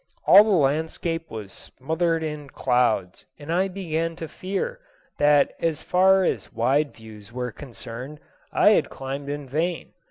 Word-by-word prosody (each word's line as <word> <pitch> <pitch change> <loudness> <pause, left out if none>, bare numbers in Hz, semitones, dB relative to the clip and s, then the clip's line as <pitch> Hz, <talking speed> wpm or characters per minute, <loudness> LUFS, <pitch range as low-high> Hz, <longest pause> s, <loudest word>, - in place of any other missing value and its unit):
All 200 - +9
the 220 - -2
landscape 160 0 0
was 105 -4 -8
smothered 160 +4 -2
in 150 -2 -5
clouds 120 -9 0
and 150 +3 -5
I 185 +3 +2
began 165 -3 -3
to 165 -1 -6
fear 195 - -4 0.4
that 145 -1 +4
as 165 -2 -1
far 190 +1 +4
as - - -2
wide 135 +6 +1
views 110 -2 -13
were 125 0 -4
concerned 130 +2 -9 0.3
I - - +5
had - - +2
climbed 135 +1 -6
in 145 -1 -5
vain. 165 +6 -2
150 Hz, 150 wpm, -24 LUFS, 130-165 Hz, 0.4 s, All